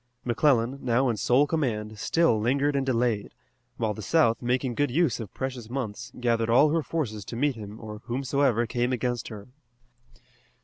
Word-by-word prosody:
McClellan, 125 -1 +2
now 125 +1 +2
in 115 - -1
sole 125 +7 +3
command, 110 -9 -2
still 165 -3 +2
lingered 140 +5 +1
and 135 - +1
delayed, 120 -5 0 0.4
while 110 -2 0
the 110 - -8
South, 115 -3 +2
making 125 +1 0
good 145 +4 +1
use 145 -2 +1
of 110 -5 -7
precious 130 -4 -5
months, 125 -2 -5
gathered 115 -2 +1
all 140 +6 +5
her 165 +1 +2
forces 125 -11 -3
to 115 - -7
meet 145 +4 +1
him 105 -1 -9
or 105 -2 -8
whomsoever 130 -1 +1
came 120 +2 -1
against 120 -1 -2
her. 105 0 -9
120 Hz, 170 wpm, -27 LUFS, 115-135 Hz, 0.4 s, all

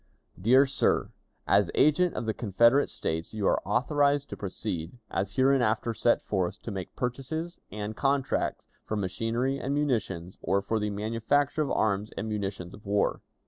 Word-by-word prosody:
"Dear 130 +7 +6
Sir: 135 - +1 0.4
As 100 -1 +4
agent 170 +4 +4
of - - -3
the 110 - 0
Confederate 115 +6 +3
States, 80 +6 -3
you 105 -2 -1
are - - +3
authorized 140 +5 +2
to - - -5
proceed, 95 -1 -4
as 95 +1 -2
hereinafter 120 -4 +2
set 120 +1 +2
forth, 95 0 -1
to 115 - -5
make 95 -2 -6
purchases, 150 +8 -3
and 105 +1 -5
contracts 135 +1 0 0.2
for 110 - -3
machinery 115 +7 -1
and 140 +2 -2
munitions, 100 - -1
or 100 0 +1
for 110 +2 0
the 105 0 -1
manufacture 115 +8 0
of 145 - 0
arms 105 0 +1
and 110 - -3
munitions 100 -4 -4
of 105 - -13
war. 100 0 0
110 Hz, 160 wpm, -28 LUFS, 100-135 Hz, 0.4 s, Dear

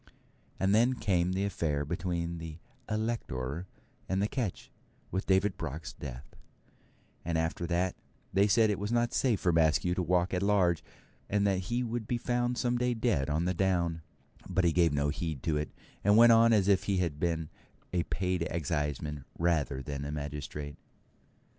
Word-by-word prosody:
And 95 +1 +2
then 120 +4 +4
came 90 -5 +1
the 95 +2 0
affair 75 -7 -1
between 85 +1 -2
the 80 -1 -7 0.3
Elector 95 - -2 0.4
and 95 +1 +1
the 100 - +2
ketch, 115 -6 -4 0.4
with 95 +2 -2
David 95 +1 +2
Block's 80 +3 -5
death; 70 -3 -9 0.9
and 85 -1 -1
after 80 +1 -1
that 90 +1 0 0.4
they 100 +2 +4
said 110 +1 +4
it 100 - -2
was 105 +2 -3
not 120 0 +1
safe 120 -6 +2
for 90 - +2
Maskew 80 +2 +3
to 90 - -1
walk 90 +1 +1
at 90 - 0
large, 90 -5 +2 0.5
and 100 0 +2
that 95 -2 +2
he 120 +1 0
would 115 -2 -3
be 120 - 0
found 120 0 0
some 120 0 +1
day 125 0 +1
dead 110 - +1
on 80 +3 0
the 90 - +1
down; 85 -3 0 0.5
but 95 0 +1
he 85 - +4
gave 85 -1 +3
no 70 0 +1
heed 80 -2 -3
to 80 -2 0
it, 75 0 -2 0.3
and 105 +2 +5
went 120 0 +8
on 115 0 +6
as 100 -4 +4
if 100 -1 +3
he 100 -1 +1
had 85 -5 -1
been 80 -2 -1 0.4
a 90 - +2
paid 90 +1 -1
exciseman 75 -2 -2
rather 75 -6 0
than 70 0 -4
a 70 - -4
magistrate. 75 0 -5
90 Hz, 180 wpm, -30 LUFS, 80-105 Hz, 0.9 s, went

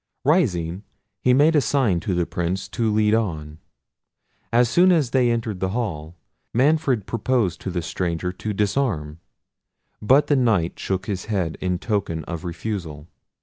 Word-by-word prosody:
Rising, 95 - +1 0.4
he 125 - +3
made 145 +5 +4
a 150 - +5
sign 125 -10 +1
to 90 +3 -2
the 85 -1 +1
Prince 90 +3 -3
to 115 -2 0
lead 105 0 +2
on. 80 -9 -2 0.9
As 120 +1 +4
soon 175 +10 +4
as 150 -9 +2
they 125 -2 +3
entered 115 -4 -2
the 95 0 -1
hall, 85 -8 -4 0.4
Manfred 135 -4 +2
proposed 115 -7 -1
to - - -4
the 90 -2 -3
stranger 85 +1 -2
to 105 +4 -5
disarm, 100 - -1 0.8
but 135 +7 +4
the 145 - +2
Knight 110 -10 +1
shook 95 0 -2
his 95 -4 -4
head 95 -7 -1
in 90 -1 0
token 100 -6 -2
of 85 -3 -6
refusal. 85 -4 -5
100 Hz, 155 wpm, -23 LUFS, 85-120 Hz, 0.9 s, a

